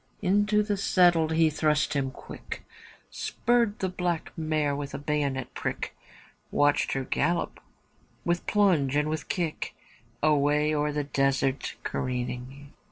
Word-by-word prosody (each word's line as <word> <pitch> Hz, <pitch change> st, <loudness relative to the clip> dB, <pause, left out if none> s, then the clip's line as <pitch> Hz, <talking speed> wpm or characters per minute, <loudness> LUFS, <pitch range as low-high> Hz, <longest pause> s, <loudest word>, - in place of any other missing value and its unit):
Into 205 Hz, +2 st, +3 dB
the 205 Hz, -1 st, -1 dB
saddle 175 Hz, -4 st, +4 dB
he 160 Hz, 0 st, +3 dB
thrust 150 Hz, 0 st, +1 dB
him 140 Hz, -2 st, 0 dB
quick, -, -, -9 dB, 0.5 s
Spurred 230 Hz, -, +1 dB
the 190 Hz, -, -1 dB
black 180 Hz, -2 st, -2 dB
mare 155 Hz, -3 st, 0 dB
with 140 Hz, -1 st, -5 dB
a -, -, -2 dB
bayonet 145 Hz, -2 st, -2 dB
prick. -, -, -4 dB, 0.5 s
Watched 145 Hz, 0 st, +2 dB
her 135 Hz, -, -1 dB
gallop 170 Hz, +6 st, 0 dB, 0.7 s
with 175 Hz, 0 st, 0 dB
plunge 175 Hz, -10 st, +3 dB
and 150 Hz, +1 st, +2 dB
with 155 Hz, -2 st, -4 dB
kick 170 Hz, -4 st, -2 dB, 0.5 s
Away 150 Hz, 0 st, +3 dB
o'er 150 Hz, 0 st, +1 dB
the 150 Hz, 0 st, -1 dB
desert 135 Hz, -1 st, 0 dB
careering. 125 Hz, +2 st, -4 dB
150 Hz, 130 wpm, -27 LUFS, 140-175 Hz, 0.7 s, saddle